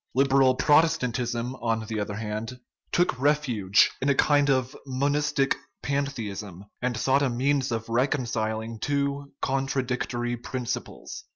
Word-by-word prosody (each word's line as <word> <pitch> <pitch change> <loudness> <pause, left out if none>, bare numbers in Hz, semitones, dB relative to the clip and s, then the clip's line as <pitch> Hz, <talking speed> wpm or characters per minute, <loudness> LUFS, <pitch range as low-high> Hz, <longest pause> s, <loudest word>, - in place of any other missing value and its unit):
Liberal 135 -1 +4
Protestantism, 125 -6 +2
on 115 -2 -1
the 110 0 -3
other 105 0 -3
hand, 110 +3 -5 0.3
took 175 -6 +1
refuge 130 -9 +3
in 135 - +1
a 140 - +4
kind 145 +1 +3
of 130 -2 +1
monistic 140 +1 +1 0.3
pantheism, 110 -9 -3 0.2
and 125 -2 -1
sought 135 +1 +2
a 140 - +2
means 130 +2 +1
of 115 -1 -2
reconciling 115 -3 -1
two 140 +2 -1
contradictory 130 -3 -1
prin 125 +2 -5
ciples. - - -5
130 Hz, 125 wpm, -26 LUFS, 115-140 Hz, 0.3 s, Liberal